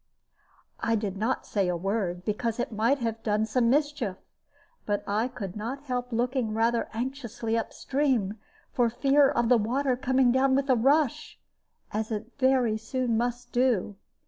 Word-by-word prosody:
I 230 0 +1
did 205 -3 -2
not 225 +6 -1
say 200 -3 0
a 180 -1 0
word, 185 -1 -2
because 225 +2 -2
it 240 - -2
might 225 +6 +2
have 225 -3 -3
done 215 -1 +1
some 230 +2 +1
mischief, 285 -8 0 0.7
but 205 -1 -1
I 215 +4 0
could 200 -8 -7
not 240 +6 -5
help 250 -2 -3
looking 240 -1 0
rather 230 +1 +1
anxiously 235 -1 -3
up 230 - -2
stream, 250 -8 0 0.3
for 240 -2 +3
fear 275 +4 +4
of 235 -1 +1
the 245 0 +5
water 255 +5 0
coming 260 -1 +2
down 265 +1 +3
with 275 0 +1
a - - +5
rush, 275 +3 +1 0.5
as 215 +1 -2
it 220 +2 -4
very 255 -4 +3
soon 240 +1 -1
must 240 +1 -2
do. 240 -6 +1
235 Hz, 165 wpm, -27 LUFS, 215-260 Hz, 0.7 s, the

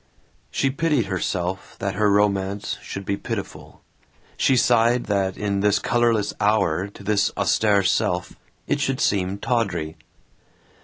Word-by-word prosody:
She 135 - 0
pitied 145 -4 +1
herself 95 -1 -3
that 100 -1 -2
her 105 +2 +2
romance 100 -1 0
should 100 0 -7
be 100 - -1
pitiful; - - -7 0.5
she 130 - +2
sighed 120 0 +3
that 100 -2 -1
in 100 -1 -1
this 105 0 +3
colorless 115 -3 +1
hour, 100 -4 +1
to 100 0 -13
this 105 +1 +2
austere 105 -2 +2
self, 90 -1 0 0.3
it - - 0
should 135 -1 -1
seem 95 -1 0
tawdry. 100 -10 -1
100 Hz, 135 wpm, -23 LUFS, 95-115 Hz, 0.5 s, sighed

